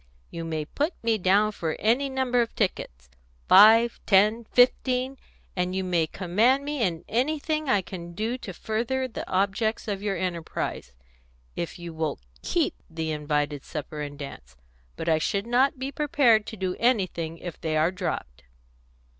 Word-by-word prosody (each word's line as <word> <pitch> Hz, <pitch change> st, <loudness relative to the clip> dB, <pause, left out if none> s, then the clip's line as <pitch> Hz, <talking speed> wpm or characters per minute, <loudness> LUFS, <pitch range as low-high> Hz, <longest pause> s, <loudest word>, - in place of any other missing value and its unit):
"You 165 Hz, -, -5 dB
may 160 Hz, -2 st, -3 dB
put 295 Hz, -, -2 dB
me 225 Hz, -1 st, +1 dB
down 200 Hz, +3 st, +3 dB
for 165 Hz, -6 st, -3 dB
any 245 Hz, +6 st, +2 dB
number 260 Hz, -2 st, +1 dB
of 230 Hz, -, -3 dB
tickets 65 Hz, -, -2 dB, 0.4 s
five, 225 Hz, +4 st, +7 dB
ten, 215 Hz, +3 st, +4 dB
fifteen 255 Hz, +2 st, +2 dB, 0.4 s
and 180 Hz, 0 st, -1 dB
you 190 Hz, -, -1 dB
may 175 Hz, -3 st, +1 dB
command 220 Hz, -, +2 dB
me 290 Hz, -2 st, -3 dB
in 175 Hz, -5 st, -1 dB
anything 305 Hz, +5 st, -1 dB
I 200 Hz, -6 st, +3 dB
can 170 Hz, -2 st, -8 dB
do 220 Hz, +7 st, -2 dB
to 195 Hz, -, -7 dB
further 235 Hz, +7 st, -2 dB
the 240 Hz, -, -7 dB
objects 200 Hz, +4 st, 0 dB
of 200 Hz, -2 st, -2 dB
your 200 Hz, -2 st, -1 dB
enterprise, 170 Hz, -, -4 dB, 0.6 s
if 170 Hz, -, -4 dB
you 170 Hz, -1 st, -8 dB
will 160 Hz, -2 st, -2 dB, 0.2 s
keep -, -, 0 dB, 0.2 s
the 160 Hz, -1 st, -3 dB
invited 150 Hz, -1 st, -1 dB
supper 150 Hz, 0 st, -6 dB
and 145 Hz, -1 st, -6 dB
dance. 65 Hz, -, -9 dB, 0.4 s
But -, -, -6 dB
I 160 Hz, -1 st, +3 dB
should 200 Hz, +6 st, -1 dB
not 255 Hz, +4 st, +2 dB
be 265 Hz, +2 st, -4 dB
prepared 270 Hz, -8 st, +3 dB
to 220 Hz, -, -7 dB
do 185 Hz, -1 st, -2 dB
anything 185 Hz, -9 st, 0 dB
if 175 Hz, -1 st, -8 dB
they 155 Hz, -1 st, -1 dB
are 160 Hz, +3 st, +3 dB
dropped." 175 Hz, -, -4 dB
195 Hz, 165 wpm, -26 LUFS, 165-240 Hz, 0.6 s, five